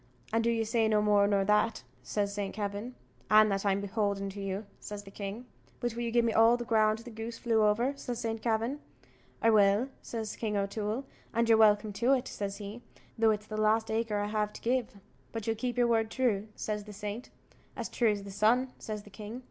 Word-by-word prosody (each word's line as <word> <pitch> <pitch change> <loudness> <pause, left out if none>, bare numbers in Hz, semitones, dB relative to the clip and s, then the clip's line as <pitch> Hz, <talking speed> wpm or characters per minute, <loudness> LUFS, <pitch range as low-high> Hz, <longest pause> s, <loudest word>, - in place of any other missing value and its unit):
"And 225 0 +2
do 235 - +2
you 225 -1 +1
say 225 0 +2
no 215 -1 +3
more 205 -1 +4
nor 200 -1 +2
that?" 210 +2 +2 0.2
says 200 -1 -2
Saint 200 -2 -3
Kavin. 205 +4 -4 0.3
"And 215 0 +6
that 195 0 0
I'm 195 0 +2
beholden 200 -1 -1
to 200 +1 -7
you," 195 +2 -3
says 205 -1 -7
the 195 - -12
king. 200 +4 -6 0.3
"But 240 -2 -1
will 235 - -4
you 235 -1 -2
gi'e 235 0 +3
me 230 -1 +1
all 225 +2 +6
the 240 - -5
ground 215 -1 +3
the 230 +2 -10
goose 225 +1 -6
flew 225 -3 +2
over?" 220 +6 +3
says 245 -3 -5
Saint 225 -1 -3
Kavin. 230 +5 0 0.6
"I 225 - +6
will," 205 +4 +4
says 220 -2 -5
King 210 -2 -1
O'Toole, 210 +5 -2 0.3
"and 230 0 +2
you're 225 - +6
welcome 210 -1 +4
to 240 +6 +3
it," 255 -2 0
says 200 -1 -4
he, 210 +3 -7 0.3
"though 225 -1 +4
it's 210 -1 0
the 215 0 -6
last 220 +1 +2
acre 220 -1 0
I 205 - 0
have 210 0 -1
to - - -10
give." 240 -3 -1 0.3
"But 225 -2 -5
you'll 225 - 0
keep 245 +2 -3
your 245 - +4
word 225 -2 +2
true," 220 -5 0
says 210 -1 -3
the 210 - -9
saint. 210 +4 -6 0.5
"As - - -3
true 235 -2 +2
as 205 -1 -1
the 200 - -8
sun," 235 +6 +2
says 210 -1 -5
the 205 - -15
king. 215 +4 -7
215 Hz, 225 wpm, -30 LUFS, 205-230 Hz, 0.6 s, And